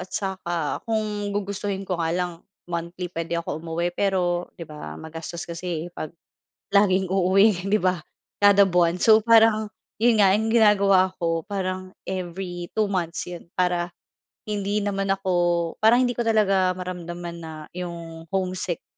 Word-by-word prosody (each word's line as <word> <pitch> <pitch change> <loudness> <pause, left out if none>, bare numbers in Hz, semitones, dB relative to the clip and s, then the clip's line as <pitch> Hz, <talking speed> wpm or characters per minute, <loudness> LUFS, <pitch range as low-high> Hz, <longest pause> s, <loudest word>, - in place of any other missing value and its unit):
At 180 - -8
saka 175 -6 -2
kung 210 -2 -1
gugustuhin 200 -1 -3
ko 185 -2 -3
nga 165 - 0
lang, 180 -1 -1 0.3
monthly 175 +1 -5
puwede 165 0 -3
ako 165 -2 -3
umuwi 170 +2 -2
pero 180 -3 0
'di 165 - -7
ba 150 - -8
magastos 165 - -7
kasi 170 -1 -4
eh - - -7
'pag 155 - -5 0.6
laging 190 -2 +3
uuwi 190 +1 +3
'di 200 - +1
ba 185 -1 +2 0.4
kada 200 0 +6
buwan. 175 -2 +3
So, 220 -1 +7
parang 225 -1 +5 0.3
'yon 225 -1 +4
nga, 195 - +6
'yung 215 +3 +2
ginagawa 200 -4 +5
ko, 165 -2 0
parang 185 -1 -3 0.2
every 175 -1 -5
two 215 - +4
months 180 -4 -2
'yun. 175 -1 -9
Para 180 -1 +1 0.5
hindi 205 0 -1
naman 195 -1 -1
ako, 190 -1 -2 0.5
parang 235 +4 +5
hindi 245 - +1
ko 240 - 0
talaga 195 -4 +3
maramdaman 175 -1 -6
na 160 -1 -8 0.2
'yung 170 -2 -7
homesick, 185 -2 -2
185 Hz, 150 wpm, -24 LUFS, 170-200 Hz, 0.6 s, So